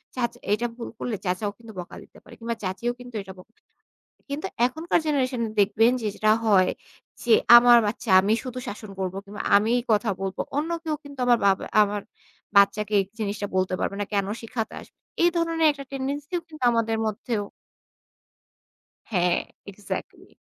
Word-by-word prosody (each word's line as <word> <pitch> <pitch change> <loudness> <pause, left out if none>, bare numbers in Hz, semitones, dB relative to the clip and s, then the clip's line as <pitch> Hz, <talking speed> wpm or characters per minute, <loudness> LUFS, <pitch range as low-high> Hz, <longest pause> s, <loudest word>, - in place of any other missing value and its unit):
চাচা 240 -2 -2
এটা 235 +3 0
ভুল 235 - -6
করলে 240 - -2
চাচাও 185 +3 -1
কিন্তু 230 -1 -12
বকা 175 - -8
দিতে - - -19
পারে। - - -15
কিংবা 230 0 -3
চাচীও 190 +6 -2
কিন্তু 245 -1 -11
এটা 190 0 -10
ব - - -14 0.9
কিন্তু 285 +2 -3 0.2
এখনকার 320 +7 0
জেনারেশন 260 -4 0
এ - - -7
দেখবেন 220 +4 +4
যে - - -2
যেটা 215 0 +3
হয় 190 -3 +5 0.5
যে 240 - +2 0.2
আমার 240 0 +8
বাচ্চা 210 +1 -3
আমি 205 +3 +2
শুধু 255 -1 -5
শাসন 210 0 -7
করব 190 -1 -2
কিংবা 205 +1 -7
আমি 215 +3 +2 0.2
কথা 215 0 +2
বলব। 195 0 -4 0.2
অন্য 310 +3 -1
কেউ 315 -1 -1
কিন্তু 285 -1 -12
আমার 240 -1 +5
বাব 195 -1 +4 0.2
আমার 205 0 -1 0.6
বাচ্চাকে 205 +1 +4 0.2
জিনিসটা 205 -1 -2
বলতে 185 0 +1
পারবে - - -1
না। - - 0
কেন 200 -2 +1 0.2
শিখাতে 225 -1 -4
আসবে? - - -17 0.3
এই 345 - +5
ধরনের 330 -1 +2
একটা 280 -1 -9
টেনডেন্সি 280 +3 -4
ও - - -29
কিন্তু 310 -4 -13
আমাদের 225 -1 +1
মধ্যেও 215 +1 -2 1.7
হ্যাঁ, 180 -3 +2 0.3
এক্সাক্টলি। 200 +1 -7
225 Hz, 165 wpm, -25 LUFS, 200-255 Hz, 1.7 s, আমার